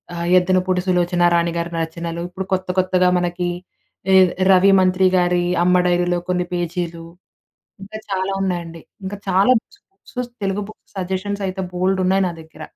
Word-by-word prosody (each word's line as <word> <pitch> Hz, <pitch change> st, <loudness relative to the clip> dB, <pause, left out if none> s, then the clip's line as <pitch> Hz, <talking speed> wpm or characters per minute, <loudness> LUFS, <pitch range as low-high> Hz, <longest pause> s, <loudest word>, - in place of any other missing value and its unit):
ఆహ్, 170 Hz, 0 st, -3 dB
'యద్దనపూడి 185 Hz, 0 st, +2 dB
సులోచనారాణిగారి' 175 Hz, -1 st, +1 dB
రచనలు. 170 Hz, +1 st, -5 dB
ఇప్పుడు 190 Hz, +1 st, -6 dB
కొత్త, 185 Hz, 0 st, -1 dB
కొత్తగా 185 Hz, 0 st, +2 dB
మనకి 175 Hz, 0 st, -2 dB, 0.6 s
ఎద్ 185 Hz, -2 st, +6 dB, 0.2 s
రవి 190 Hz, +1 st, +6 dB
మంత్రిగారి 185 Hz, -1 st, +2 dB, 0.2 s
'అమ్మ 180 Hz, +1 st, +3 dB
డైరీలో 175 Hz, 0 st, +1 dB
కొన్ని 180 Hz, -1 st, 0 dB
పేజీలు'. 170 Hz, -1 st, -3 dB, 0.8 s
ఇంకా 215 Hz, +2 st, -8 dB
చాలా 190 Hz, 0 st, -1 dB
ఉన్నాయండి. 170 Hz, -3 st, -4 dB, 0.2 s
ఇంకా 195 Hz, +1 st, -5 dB
చాలా 195 Hz, +5 st, +3 dB
books, 410 Hz, -, -25 dB, 0.3 s
books 250 Hz, -1 st, -4 dB
Telugu 195 Hz, +1 st, -1 dB
books 215 Hz, -, -16 dB
suggestions 190 Hz, +2 st, -3 dB
అయితే 190 Hz, +1 st, -5 dB
బోల్డున్నాయి 190 Hz, +1 st, +1 dB
నా -, -, -5 dB
దగ్గర. 160 Hz, 0 st, -14 dB
180 Hz, 135 wpm, -20 LUFS, 175-190 Hz, 0.8 s, ఎద్